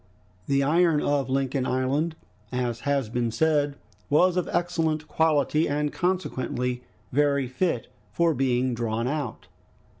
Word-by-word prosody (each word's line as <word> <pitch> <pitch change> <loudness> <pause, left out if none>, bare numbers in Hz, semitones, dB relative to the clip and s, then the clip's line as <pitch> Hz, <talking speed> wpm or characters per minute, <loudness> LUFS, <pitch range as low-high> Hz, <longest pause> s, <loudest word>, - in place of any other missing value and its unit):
The 140 0 +2
iron 165 +2 +3
of 145 -3 0
Lincoln 135 0 0
Island, 140 +6 0 0.4
as 125 -2 -2
has 140 -4 +1
been 120 +1 -1
said, 145 +3 +1 0.3
was 175 +5 +4
of 180 - -1
excellent 160 -3 0
quality, 155 0 +2
and 150 0 -1
consequently 130 -9 -1 0.3
very 140 -1 +2
fit 130 -1 -1 0.3
for 170 -1 +2
being 130 -1 +1
drawn 115 0 -1
out. 145 -7 -3
140 Hz, 125 wpm, -26 LUFS, 125-160 Hz, 0.4 s, was